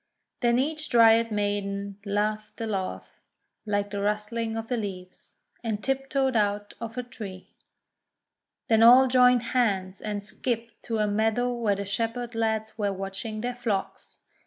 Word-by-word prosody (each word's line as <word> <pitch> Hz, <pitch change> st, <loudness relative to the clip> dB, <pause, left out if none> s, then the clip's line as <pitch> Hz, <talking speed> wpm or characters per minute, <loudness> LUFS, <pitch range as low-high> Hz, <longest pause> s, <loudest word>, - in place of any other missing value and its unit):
Then 240 Hz, -1 st, +3 dB
each 305 Hz, +4 st, -1 dB
Dryad 230 Hz, -1 st, +5 dB
Maiden 200 Hz, -1 st, -2 dB
laughed 210 Hz, +1 st, -2 dB
a 225 Hz, -, -2 dB
laugh 195 Hz, -4 st, -4 dB, 0.5 s
like 205 Hz, 0 st, 0 dB
the 200 Hz, -1 st, -3 dB
rustling 215 Hz, +2 st, -1 dB
of 225 Hz, 0 st, -4 dB
the 250 Hz, -, 0 dB
leaves, 185 Hz, -5 st, -7 dB, 0.3 s
and 215 Hz, -2 st, -2 dB
tiptoed 270 Hz, -1 st, 0 dB
out 205 Hz, -1 st, 0 dB
of 230 Hz, -1 st, -5 dB
her 250 Hz, -, -3 dB
tree. 205 Hz, -6 st, -9 dB, 1.2 s
Then 225 Hz, -1 st, +4 dB
all 250 Hz, +3 st, +8 dB
joined 250 Hz, -1 st, +5 dB
hands, 195 Hz, -6 st, 0 dB
and 210 Hz, -1 st, -3 dB
skipped 230 Hz, +2 st, -4 dB
to 225 Hz, -, -1 dB
a 215 Hz, -, +2 dB
meadow 220 Hz, +4 st, +1 dB
where 225 Hz, -4 st, +1 dB
the 200 Hz, +1 st, -4 dB
Shepherd 230 Hz, +4 st, -2 dB
lads 220 Hz, -1 st, -1 dB
were 205 Hz, -1 st, +1 dB
watching 195 Hz, +3 st, -5 dB
their 245 Hz, +1 st, -2 dB
flocks. 225 Hz, -5 st, -4 dB
220 Hz, 150 wpm, -27 LUFS, 205-240 Hz, 1.2 s, all